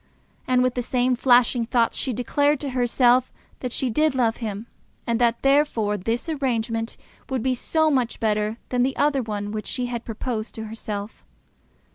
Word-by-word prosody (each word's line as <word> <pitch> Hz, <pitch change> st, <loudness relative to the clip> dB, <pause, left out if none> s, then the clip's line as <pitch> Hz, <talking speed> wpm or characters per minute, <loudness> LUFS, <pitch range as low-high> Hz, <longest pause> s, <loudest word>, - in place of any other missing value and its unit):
And 250 Hz, 0 st, +3 dB
with 255 Hz, -1 st, +1 dB
the 250 Hz, -, -1 dB
same 250 Hz, +1 st, +1 dB
flashing 245 Hz, -1 st, +3 dB
thoughts 235 Hz, -2 st, +2 dB
she 260 Hz, -, -1 dB
declared 285 Hz, +5 st, +1 dB
to 280 Hz, -2 st, -3 dB
herself 250 Hz, 0 st, +3 dB, 0.3 s
that 250 Hz, -, -4 dB
she 255 Hz, 0 st, -1 dB
did 305 Hz, +4 st, +2 dB
love 235 Hz, -3 st, +1 dB
him, 215 Hz, -2 st, -5 dB, 0.4 s
and 235 Hz, 0 st, 0 dB
that 235 Hz, -1 st, +2 dB
therefore 275 Hz, -7 st, +2 dB
this 225 Hz, -, -2 dB
arrangement 230 Hz, -6 st, -2 dB, 0.3 s
would 260 Hz, -4 st, -1 dB
be 260 Hz, -, +2 dB
so 315 Hz, +5 st, +1 dB
much 255 Hz, -4 st, 0 dB
better 215 Hz, 0 st, 0 dB
than 250 Hz, -1 st, +1 dB
that 260 Hz, +2 st, 0 dB
other 285 Hz, -2 st, +2 dB
one 205 Hz, -3 st, -4 dB
which 215 Hz, 0 st, -4 dB
she 250 Hz, -, -2 dB
had 240 Hz, -1 st, -4 dB
proposed 225 Hz, 0 st, -4 dB
to 220 Hz, -, -5 dB
herself. 215 Hz, -1 st, -6 dB
245 Hz, 175 wpm, -24 LUFS, 225-260 Hz, 0.4 s, And